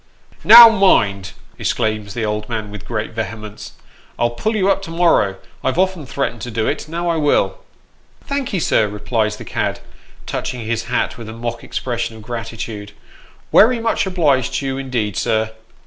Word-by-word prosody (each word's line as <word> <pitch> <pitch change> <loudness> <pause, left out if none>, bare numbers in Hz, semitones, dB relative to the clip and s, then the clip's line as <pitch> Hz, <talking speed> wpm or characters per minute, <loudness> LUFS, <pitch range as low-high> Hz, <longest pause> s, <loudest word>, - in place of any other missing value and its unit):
" - - -28
Now 235 -1 +11
mind," 100 - +2 0.3
exclaims 110 -2 -2
the 120 - -2
little 105 -1 0
old 105 +1 -6
man, 110 -3 -4
with 105 -3 -10
great 110 -2 -3
vehemence, 110 -1 -6 0.2
" - - -29
I'll 120 0 +1
pull 215 - -2
you 195 -3 +1
up 195 - +2
to 195 - -8
morrow; 165 - +2 0.3
I've 130 - 0
often 185 -6 0
threatened 120 -3 -3
to 125 - -5
do 110 -1 -1
it; 145 - -2
now 170 +2 -3
I 170 -1 +1
will." 150 -2 +1 0.7
"Thank'ee, 275 -9 -2
sir," 110 -8 +2
replies 105 +1 -1
the - - -10
cad, - - -2 0.5
touching 125 -3 -4
his 115 +1 -2
hat 125 0 -2
with 115 -2 -8
a - - -7
mock 120 0 -5
expression 115 -2 -3
of 110 - -12
gratitude; 115 -3 -6 0.3
" - - -29
werry 235 +3 +6
much 225 -3 0
obliged 145 -9 +1
to 140 - -2
you 135 0 -2
indeed, 120 -7 -2
sir." 110 -1 0
120 Hz, 185 wpm, -19 LUFS, 110-160 Hz, 0.7 s, Now